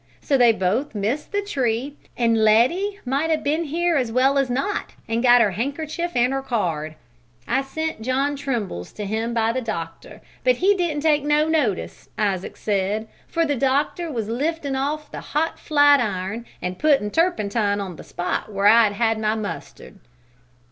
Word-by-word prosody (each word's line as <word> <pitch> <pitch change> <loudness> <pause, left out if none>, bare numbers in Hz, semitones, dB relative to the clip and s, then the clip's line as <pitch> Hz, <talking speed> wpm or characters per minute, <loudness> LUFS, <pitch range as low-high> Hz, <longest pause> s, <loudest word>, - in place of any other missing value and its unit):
So 280 - 0
they 245 -3 +6
both 220 +7 -1
missed 220 +9 -2
the 405 0 -1
tree, 265 - -1 0.2
an' 235 -1 +2
Letty 240 - +3
might 275 +6 0
'a' 320 - +3
been 310 +2 -1
here 335 +2 +1
as 250 -4 -1
well 265 +3 +3
as 270 -2 0
not 275 +12 -2
an' 230 +1 0
got 245 -1 +6
her 205 - +3
handkerchief 305 - -3
an' 245 +1 +3
her 270 0 -1
card. 165 - -2 0.5
I 265 - +1
sent 315 0 -4
John 270 +4 0
Trimble's 235 - -4
to 210 - -5
him 225 +3 -2
by 225 0 +2
the 260 - -1
doctor, 170 -8 -6 0.2
but - - +4
he 395 +2 +3
didn't 340 -6 -1
take 300 -3 +3
no 295 +1 +2
notice, 295 - -1
Isaac 195 -3 -1
said, 210 +2 -1 0.2
for 330 -1 0
the 290 -2 0
doctor 280 +6 0
was 225 -6 -3
liftin' 285 +4 -2
off 295 +3 -3
the - - -6
hot 315 +3 -2
flat 290 -2 +5
iron 210 +1 -3 0.2
an' 180 0 -3
puttin' 275 -8 +2
turpentine 215 - +1
on 190 -3 -5
the - - -10
spot 180 +4 -3
where 200 0 -1
I'd 215 0 +6
had 225 +1 +1
my 215 0 0
mustard. 205 -1 -7
255 Hz, 175 wpm, -22 LUFS, 215-295 Hz, 0.5 s, they